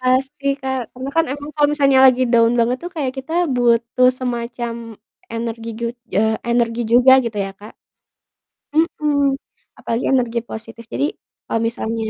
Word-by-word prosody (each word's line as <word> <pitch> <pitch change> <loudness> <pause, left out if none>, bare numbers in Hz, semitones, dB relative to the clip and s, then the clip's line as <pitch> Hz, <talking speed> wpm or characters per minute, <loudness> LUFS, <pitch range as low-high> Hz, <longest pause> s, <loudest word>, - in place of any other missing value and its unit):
pasti 260 +2 0 0.2
Kak, 265 -1 -2
karena 255 +2 -6
kan 330 - +4
emang 290 +1 -7
kalo 295 -1 +4
misalnya 275 -3 +4
lagi 255 0 +4
down 230 0 +5
banget 240 +2 +2
tuh 355 - -5
kayak 265 -4 -1
kita 265 +5 -7 0.2
butuh 235 +1 +3
semacam 240 -1 -3 0.6
energi 230 0 -4
jud 235 +1 -3 0.2
eee, 220 +1 +2
energi 235 0 +1
juga 250 +2 +7
gitu 225 -2 -4
ya - - -6
Kak. 210 - -11 1.0
Mhm, 295 -3 +1 0.4
apalagi 230 +2 -2
energi 240 -2 +1
positif, 225 +1 -8
jadi 285 - +1 0.4
kalo - - -1
misalnya 225 -1 -3
245 Hz, 150 wpm, -19 LUFS, 230-265 Hz, 1.0 s, juga